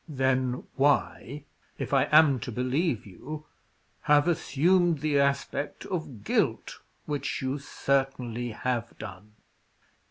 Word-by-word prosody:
"Then 130 -2 0
why 145 0 +1 0.3
if - - -4
I - - +4
am 150 -4 +5
to 120 - -5
believe 125 - 0
you 150 - -8 0.6
have 150 +1 +5
assumed 170 +1 +2
the 150 -2 +2
aspect 140 +1 -1
of 145 - -5
guilt, - - 0 0.3
which 145 -2 -2
you 130 +2 -1
certainly 130 -4 -1
have 120 0 -3
done?" 105 0 -10
135 Hz, 115 wpm, -28 LUFS, 125-150 Hz, 0.6 s, am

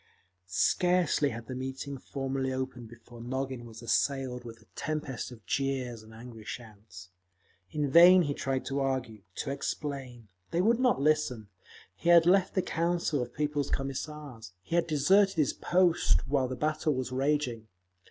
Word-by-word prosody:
Scarcely 160 - +2
had 115 -1 -7
the 130 - -6
meeting 135 +1 -5
formally 135 -1 -3
opened 130 -3 -4
before 120 0 -13
Nogin 130 0 -4
was 115 0 -11
assailed 130 0 0
with 115 -1 -10
a 110 - -22
tempest 150 -5 -4
of 120 -2 -13
jeers 130 -4 -2
and 110 0 -15
angry 115 0 -11
shouts. 105 -5 -10 0.6
In 150 +3 -1
vain 175 +3 +8
he 145 -2 -1
tried 135 -1 -2
to 140 0 -2
argue, 130 -6 -2
to 140 - -3
explain; 135 -4 -5 0.2
they 170 - -1
would 225 +6 +3
not 250 - +3
listen. 140 -8 +1 0.5
He 170 - -2
had 170 -1 +7
left 185 +1 +3
the 185 - +2
Council 170 -3 0
of 120 0 -4
People's 150 -2 -1
Commissars; 135 - -5
he 95 - -8
had 170 -1 +2
deserted 190 +6 +4
his 150 -5 +2
post 175 -5 +2
while 135 -2 +1
the 130 - -4
battle 155 +1 0
was 130 -1 -3
raging. 130 -4 -1
135 Hz, 160 wpm, -30 LUFS, 120-150 Hz, 0.6 s, vain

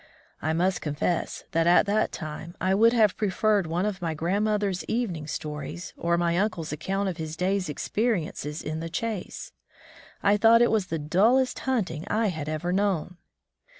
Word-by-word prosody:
I 155 +1 0
must 180 +3 +1
confess 155 +3 -2
that 165 0 +2
at 175 - +6
that 205 +1 +1
time 155 +2 -7
I 185 +2 +1
would 225 +4 +5
have 220 -5 +3
preferred 210 -2 +1
one 175 +4 0
of 205 -3 -2
grandmother's 190 +4 0
evening 185 -10 -2
stories, 150 +4 -5
or 170 0 0
my 170 0 +1
uncle's 185 -6 -1
account 195 +6 -2
of 180 -3 -3
his 160 -1 -5
day's 185 -1 0
experiences 160 - -2
in 155 +1 -3
the 165 +1 -5
chase. 215 +3 -4 0.7
I 205 +1 +4
thought 230 +2 +6
it 240 - +3
was 215 -4 +1
the 165 - -2
dullest 215 - +2
himting 195 - -1
I 215 0 +1
had 155 -4 -4
ever 155 +3 -2
known! 185 -3 0
180 Hz, 165 wpm, -26 LUFS, 160-210 Hz, 0.7 s, at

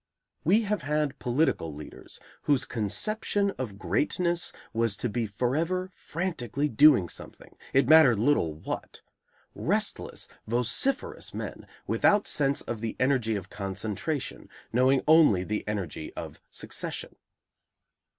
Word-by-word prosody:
We 205 +8 +4
have 210 -3 -1
had 150 -2 -1
political 125 - 0
leaders 75 +1 -10 0.3
whose 140 -3 +3
conception 200 - 0
of 110 -7 -4
greatness 175 - 0 0.2
was 115 -2 +1
to 120 - -1
be 115 +1 -1
forever 160 - -1
frantically 150 - -3
doing 135 - +6
something, - - -10 0.2
it 135 -2 +3
mattered 155 -6 +7
little 110 - +2
what; 80 - -6 0.5
restless, - - -1 0.2
vociferous 125 - 0
men, - - -6 0.2
without 205 0 +3
sense 140 -1 +1
of 115 -2 -5
the 115 -1 -3
energy 130 -4 +2
of 95 -2 -6
concentration, 105 - -4 0.2
knowing 130 +2 +3
only 150 - +6
the 105 +3 -2
energy 95 -7 -4
of - - -7
succession. - - -5
130 Hz, 120 wpm, -28 LUFS, 105-160 Hz, 0.5 s, mattered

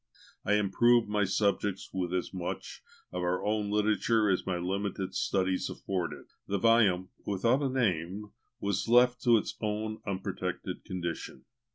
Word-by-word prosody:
I 105 - +1
improved 110 +3 +4
my 105 -1 +1
subjects 100 0 0
with 90 -2 -2
as 90 +1 -2
much 90 -2 -5 0.3
of 90 - -3
our 90 +1 -1
own 105 -1 0
literature 105 +1 +2
as 90 - -1
my 90 -2 0
limited 95 +1 -2
studies 95 -1 0
afforded. 90 -3 -4 0.2
The 100 - 0
volume, 100 -4 +3
without 115 +7 +1
a 140 - +1
name, 105 -4 -1 0.3
was 100 +1 -1
left 125 +1 +5
to 120 -2 +6
its 105 - -3
own 110 0 -2
unprotected 95 -1 -4
condition. 85 -7 -5
100 Hz, 145 wpm, -30 LUFS, 95-110 Hz, 0.3 s, to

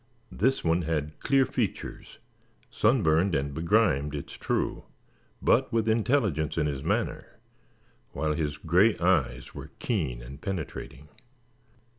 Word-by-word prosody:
This 135 +1 +1
one 85 +1 +2
had 75 -2 -3
clear 135 -1 +3
features, 120 -6 -4 0.5
sunburned 95 -6 +3
and 70 +1 -1
begrimed 80 -4 +2
it 70 - -6
is - - -9
true, - - -2 0.6
but - - +3
with 115 -1 +1
intelligence 110 - +1
in 80 - +2
his 70 -3 -2
manner; - - -2 0.7
while 75 -1 -1
his 75 -2 -2
gray 90 +8 +3
eyes 80 -9 +1
were - - -8
keen 70 - -2
and 70 +5 -10
penetrating. 75 -5 -5
80 Hz, 125 wpm, -28 LUFS, 75-105 Hz, 0.7 s, clear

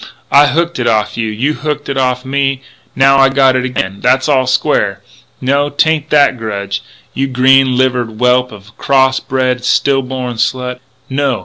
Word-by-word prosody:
I 145 +1 +6
hooked 170 +2 -1
it 120 - -1
off'n 110 0 0
you; 110 - -2
you 125 +8 -1
hooked 150 -1 -4
it 140 - -3
off'n 125 -1 -1
me; 135 -1 -1 0.3
now 135 +1 +4
I 135 0 +5
got 135 -1 +3
it 130 - 0
again. 100 -6 -3
That's 130 +1 +2
all 130 -3 +2
square.... 105 -8 0 0.4
No, 140 +2 0
'tain't 155 +1 0
that 145 -4 +3
grudge, 100 -3 -4 0.3
you 135 +1 -1
green 130 0 +3
livered 125 -2 0
whelp 125 +1 +2
of 105 -1 -13
a - - -23
cross 130 -1 +2
bred, 130 -2 -2
still 135 +1 +1
born 125 -2 -5
slut! 125 +1 -2 0.3
No! 135 -3 -1
130 Hz, 180 wpm, -13 LUFS, 125-140 Hz, 0.4 s, I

